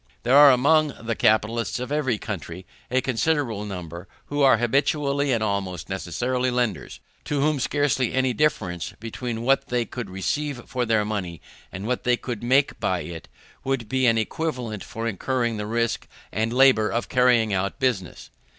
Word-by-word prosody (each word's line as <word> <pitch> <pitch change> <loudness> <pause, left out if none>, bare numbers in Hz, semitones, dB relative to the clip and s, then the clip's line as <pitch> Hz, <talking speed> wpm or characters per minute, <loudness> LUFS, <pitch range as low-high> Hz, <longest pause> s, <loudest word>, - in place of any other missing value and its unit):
There 125 +3 +3
are 145 0 +9
among 145 +4 +3
the 115 0 -2
capitalists 110 +3 +1
of 125 +2 -5
every 140 -6 0
country 90 -4 -6 0.2
a 130 +1 +2
considerable 130 -4 0
number 90 -2 -7 0.2
who 145 0 -1
are 135 -4 +6
habitually, 140 +3 +1
and 115 -3 +1
almost 95 -5 -3
necessarily, 120 +8 -1
lenders; 120 - -2 0.3
to 145 - -1
whom 150 0 +1
scarcely 135 -3 +1
any 130 -1 +1
difference 90 - -1
between 115 +1 -5
what 135 +2 +2
they 120 -1 0
could 120 -4 -6
receive 125 +8 -3
for 125 -2 -2
their 110 -2 +2
money 95 -6 -4 0.3
and 95 +1 -6
what 125 +2 -1 0.2
could 120 -4 -4
be 120 - -6
made 135 +3 +2
by 90 -2 0
it, 85 -2 -8 0.4
would 135 -4 -2
be 130 +1 +1
an 115 -1 +4
equivalent 120 -3 -3
for 115 +1 -5
incurring 120 +2 -1
the 105 0 -4
risk 115 +1 -1 0.2
and 110 +3 -1
labour 125 -4 +5
of 115 - -2
carrying 125 -4 +3
on 95 +1 0
business. 105 - -2
120 Hz, 170 wpm, -24 LUFS, 105-130 Hz, 0.4 s, are